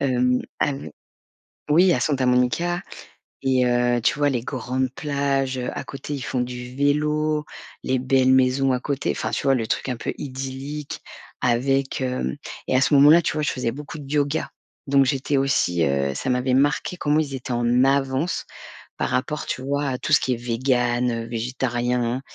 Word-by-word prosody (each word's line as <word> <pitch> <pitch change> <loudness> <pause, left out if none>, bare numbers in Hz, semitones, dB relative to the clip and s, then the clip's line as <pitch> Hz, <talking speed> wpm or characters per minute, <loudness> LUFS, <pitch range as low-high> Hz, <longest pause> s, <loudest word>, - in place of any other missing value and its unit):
Hem, 125 -2 +2 0.2
av 145 -2 +1 0.9
oui, 175 +3 +5
à 125 - +1
Santa 135 -1 +1
Monica 125 +9 +1 0.6
et 130 -1 +2
heu, 120 0 +2
tu 130 - +1
vois, 145 0 +3
les 120 -3 -1
grandes 130 0 -2
plages, 140 -3 -1
heu, 125 - -2
à - - -4
côté, 135 +2 -6
ils 140 - -4
font 125 - -2
du 125 0 -5
vélo, 150 +2 +1 0.4
les 130 0 0
belles 130 0 +3
maisons 130 +1 +3
à 125 - +1
côté. 140 -1 -2
Enfin, - - -2
tu - - -2
vois, 135 -1 +4
le 115 -2 -2
truc - - -2
un 125 - -1
peu - - -4
idyllique 135 +2 -6 0.4
avec 135 +3 +1
hem 125 - -2 0.3
et 130 - +3
à - - +4
ce 140 +3 +3
moment-là, 150 +5 +7
tu - - 0
vois, 155 0 -2
je - - +1
faisais 125 -3 -2
beaucoup 150 +3 -8
de 140 - -9
yoga, 145 +1 0 0.4
donc 140 0 +4
j'étais 135 +2 0
aussi, 90 -11 +2
heu, 70 0 0
ça 130 - -3
m'avait 125 +1 +1
marquée 145 +6 +1
comment 150 -1 +2
ils 140 -3 -3
étaient 125 -1 -5
en 120 +2 +3
avance, 135 +4 0 0.5
par - - -1
rapport, 135 +4 -1
tu 130 - -3
vois, 140 +1 -1
à 130 - -1
tout 140 - -5
ce - - +7
qui 130 - 0
est - - -1
végan, 120 0 0
heu, 115 -1 -3
végétarien. 120 +1 -1
130 Hz, 190 wpm, -23 LUFS, 125-140 Hz, 0.9 s, moment-là